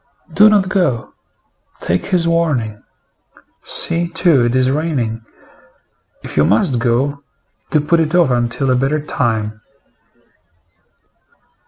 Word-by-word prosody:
Do 210 +1 +6
not 205 -3 +2
go. 175 - -1 0.7
Take 85 +1 -2
his 180 -3 0
warning. 140 -11 -1 0.8
See, 170 +1 +1
too, 165 -8 +2
it 120 +1 -1
is 130 0 +2
raining. 135 -7 -2 1.0
If - - -8
you 75 - +4
must 115 - +1
go, 130 +4 -1 0.5
do 155 - +1
put 165 +3 +1
it 160 +1 0
off 170 -7 +3
until 120 +2 0
a - - +3
better 135 +4 0
time." 110 -7 -3
135 Hz, 120 wpm, -16 LUFS, 115-165 Hz, 1.0 s, Do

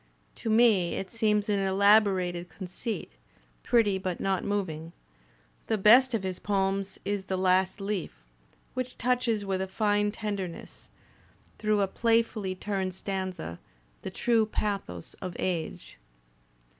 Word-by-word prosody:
To 225 - -4
me 215 -6 +4
it 190 - -5
seems 210 -3 +1
an 205 -2 +1
elaborated 190 -3 +3
conceit, 205 +4 -5 0.5
pretty 210 -5 +3
but 185 -2 -3
not 195 -1 0
moving. 170 -5 -3 0.7
The 220 - +1
best 235 +5 +6
of 210 - -2
his 185 -1 -3
poems 195 -1 -1
is 200 -1 -2
"The 190 -1 -2
Last 185 +1 +2
Leaf," 195 -3 -2 0.6
which 255 0 -4
touches 240 -4 +1
with 190 -1 -1
a 190 - -2
fine 205 +1 +1
tenderness, 200 -5 -6 0.7
through 215 -1 +2
a 195 - +2
playfully 225 -3 +1
turned 190 -1 -2
stanza, 185 - -4 0.4
the - - -5
true 225 +3 +2
pathos 200 - -3
of 180 -2 -5
age. 170 -4 -3
200 Hz, 130 wpm, -28 LUFS, 185-215 Hz, 0.7 s, best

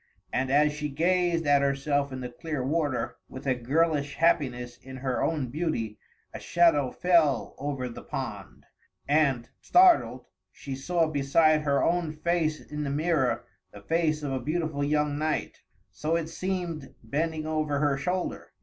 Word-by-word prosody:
And, 130 0 0
as 150 +2 +4
she 150 0 -3
gazed 170 +2 +1
at 145 -1 +4
herself 140 0 0
in 130 0 -5
the 125 - -4
clear 145 +2 -4
water, 145 -2 -1
with 130 - -9
a 135 - +3
girlish 145 +3 0
happiness 125 -7 +1
in 130 0 -10
her 130 -1 -2
own 150 -6 0
beauty, 125 -9 -2 0.3
a - - -6
shadow 165 -6 +3
fell 160 -8 +2
over 135 -3 -3
the 120 - -8
pond; - - -6 0.4
and, 140 -5 +2
startled, 360 -1 +4 0.3
she 135 -2 -7
saw 165 +5 +1
beside 155 +1 +3
her 140 -2 +1
own 170 -2 +1
face 155 -1 0
in 150 0 -6
the 140 - -2
mirror 145 -4 0 0.3
the 100 - -12
face 155 +4 0
of 140 - -2
a 130 - -1
beautiful 155 +1 -2
young 150 0 +1
knight, 155 0 -2 0.3
so 155 +2 -1
it 165 -1 -2
seemed, 170 -4 -4
bending 155 +6 -2
over 155 -2 -1
her 145 -1 +2
shoulder. 180 +6 -3
150 Hz, 160 wpm, -27 LUFS, 135-165 Hz, 0.4 s, as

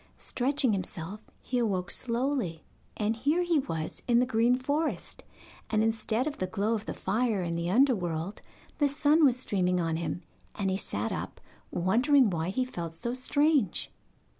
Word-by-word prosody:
Stretching 260 -2 0
himself, 185 +1 -5
he 250 - -1
awoke 190 -6 0
slowly, 240 - -1 0.3
and 215 +1 0
here 295 +9 +2
he 340 -3 +2
was 165 - -4
in 240 -1 +4
the 250 - +3
green 240 0 +3
forest, 290 +5 -2 0.5
and 215 -1 +2
instead 225 +2 0
of 300 - -4
the 185 - -1
glow 210 +3 0
of 220 -1 -3
the - - -2
fire 220 -4 0
in 170 -1 -2
the 170 +1 -2
underworld 190 - +1 0.4
the 290 -2 +3
sun 295 +3 +3
was 255 -4 +5
streaming 180 -6 +1
on 165 -2 0
him, 170 +1 -3 0.3
and 195 -2 -1
he - - +1
sat - - -2
up - - -5 0.3
wondering 240 - +3
why 165 0 -1
he 255 +7 0
felt 170 -9 -6
so 235 +9 -2
strange. 280 - +2
225 Hz, 165 wpm, -29 LUFS, 180-260 Hz, 0.5 s, was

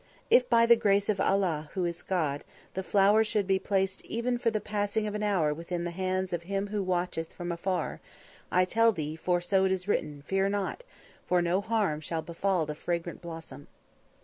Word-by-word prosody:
If 250 0 +5
by 230 -1 +5
the 235 0 +7
grace 205 -3 +2
of 200 -2 +1
Allah, 170 -6 +1
who 185 -2 0
is 170 0 -3
God, 155 -6 -1 0.3
the 190 - -2
flower 205 +3 +4
should 210 -2 0
be 190 0 +2
placed 190 -1 -1
even 240 +1 -1
for 240 -1 +2
the 220 -1 -1
passing 210 +1 -1
of 210 - -3
an 210 - -3
hour 185 -8 +2
within 170 +2 -4
the 175 - -3
hands 185 +1 -2
of 170 - -1
him 195 +3 -2
who 210 0 -1
watcheth 180 -3 -2
from 175 0 -5
afar, 180 +2 -2 0.5
I 185 0 +4
tell 230 +4 +4
thee, 155 -5 -4
for 175 +2 0
so 190 +2 +2
it 190 - +2
is 190 0 -1
written, 150 -8 -1
fear 195 +2 +1
not, 205 - -2 0.4
for 180 - +3
no 175 +3 +1
harm 205 -8 0
shall 160 +1 -3
befall 170 +1 0
the 150 - -4
fragrant 170 +2 -3
blossom." 160 -5 -9
190 Hz, 200 wpm, -29 LUFS, 170-205 Hz, 0.5 s, the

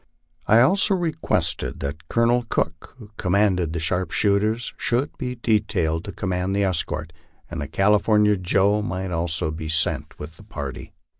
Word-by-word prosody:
I 110 +2 +6
also 195 - +4
requested 160 - -1
that 75 +3 -5
Colonel 120 +1 +2
Cook, 80 -3 -2
who 110 -4 -13
commanded 90 -3 +1
the 85 - -3
sharpshooters, 100 +7 0
should 125 +3 -1
be 125 -1 -3
detailed 95 -8 0
to 100 - -5
command 95 0 -2
the 100 - +2
escort, 80 -4 -2 0.4
and - - -4
that 75 - -6
California 105 +1 +3
Joe 100 +3 +2
might 95 -1 -4
also 85 -1 -1
be 80 0 -6
sent 80 +1 0
with 75 +2 -9
the - - -14
party. - - -7
95 Hz, 150 wpm, -23 LUFS, 80-110 Hz, 0.4 s, I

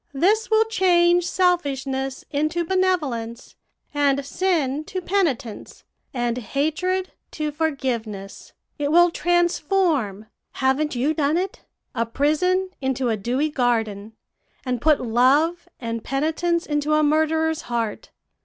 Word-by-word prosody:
This 415 +10 +2
will 440 0 +4
change 355 -5 +3
selfishness 275 -7 0
into 310 +4 0
benevolence, 300 -11 -1 0.4
and 280 -1 +1
sin 305 -4 0
to 375 - -4
penitence, 325 - -2 0.3
and 240 -1 -1
hatred 315 - -1 0.2
to 305 -1 -2
forgiveness; 245 -10 -3 0.3
it 290 0 0
will 345 +1 +6
transform 345 - +1 0.3
haven't 265 +2 0
you 270 +6 +1
done 300 +1 +1
it? 375 +2 -3 0.3
a 230 -2 -1
prison 360 +9 +1
into 265 -2 0
a 225 - +1
dewy 250 +9 -1
garden, 225 -6 -1 0.5
and 250 -2 -2
put 305 0 +4
love 280 +9 +2
and 230 -2 -4
penitence 320 +5 0
into 295 0 0
a 305 - +3
murderer's 315 +1 +1
heart. 230 -3 -3
295 Hz, 115 wpm, -23 LUFS, 255-345 Hz, 0.5 s, will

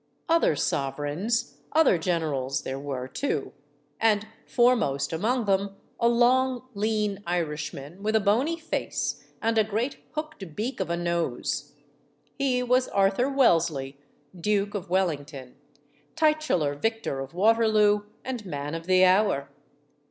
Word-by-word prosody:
Other 330 - +3
sovereigns, 145 - -1 0.2
other 310 - +4
generals, 155 -6 -1
there 135 +1 -4
were, 135 -3 -4
too. 250 - -2 0.5
And, 215 -2 +3 0.2
foremost 210 - +2
among 225 +8 0
them, 195 0 0 0.2
a 235 - +4
long, 250 +1 +3
lean 210 -1 -1
Irishman, 160 -1 -3
with 215 +1 0
a - - +6
bony 235 +11 +1
face 330 0 -3 0.2
and 225 0 +2
a - - +5
great 220 +6 -2 0.2
hooked 305 - -6
beak 235 +6 -3
of - - -2
a 170 - 0
nose. 170 -7 -2 0.7
He 255 -2 +1
was 250 +1 +2
Arthur 200 +6 +2
Wellesley, 165 - +2 0.4
Duke 205 +3 0
of 200 -5 -5
Wellington, 145 -8 -2 0.6
titular 305 - +2
Vic 225 +10 -2
tor 135 - -2
of 135 +4 -7
Waterloo 215 0 +4 0.2
and 250 -3 -4
Man 145 -5 -5
of 165 +1 -6
the 185 0 +6
Hour. 185 -7 +3
200 Hz, 130 wpm, -26 LUFS, 155-235 Hz, 0.7 s, a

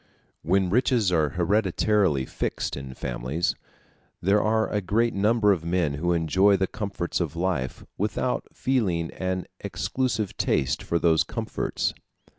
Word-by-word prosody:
When 95 +2 +1
riches 120 -3 +3
are 80 -4 +2
hereditarily 95 -4 +2
fixed - - -3
in 65 -2 -7
families, 65 +7 -2 0.7
there 100 +3 +3
are 110 +1 +2
a 105 - -1
great 115 +5 +1
number 105 +1 +3
of 90 -5 0
men 85 -3 0
who 85 +5 -1
enjoy 95 +5 +3
the 95 - +1
comforts 100 -3 -3
of 85 -3 -2
life 85 -7 -2
without - - -1
feeling 95 -11 0
an 95 -1 -3
exclusive 125 -6 -2
taste 65 - +1
for 85 - 0
those 80 -2 +3
comforts. - - -2
95 Hz, 135 wpm, -26 LUFS, 85-105 Hz, 0.7 s, riches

